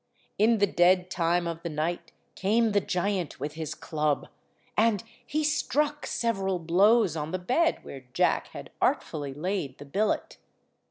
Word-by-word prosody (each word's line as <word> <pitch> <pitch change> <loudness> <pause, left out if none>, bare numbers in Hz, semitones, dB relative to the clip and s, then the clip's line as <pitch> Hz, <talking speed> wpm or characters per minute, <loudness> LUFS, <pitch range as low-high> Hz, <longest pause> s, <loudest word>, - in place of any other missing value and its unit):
In 225 +2 +5
the 205 - +4
dead 180 0 +3
time 175 0 +1
of 165 -1 -4
the 170 - -4
night 160 +3 -3 0.2
came 220 +3 +2
the 205 0 +3
giant 185 -3 -2
with 145 +3 -4
his 160 -1 -5
club, 155 -2 -1 0.5
and 215 -3 +2 0.2
he 310 +1 -1
struck 295 0 0
several 195 -5 0
blows 190 +3 +4
on 150 -1 -3
the 185 - -2
bed 260 - +1
where 135 -2 -10
Jack - - +1
had - - -10
artfully 140 -3 0
laid 165 -4 -3
the 145 - -10
billet. 205 +10 -1
180 Hz, 155 wpm, -28 LUFS, 160-215 Hz, 0.5 s, In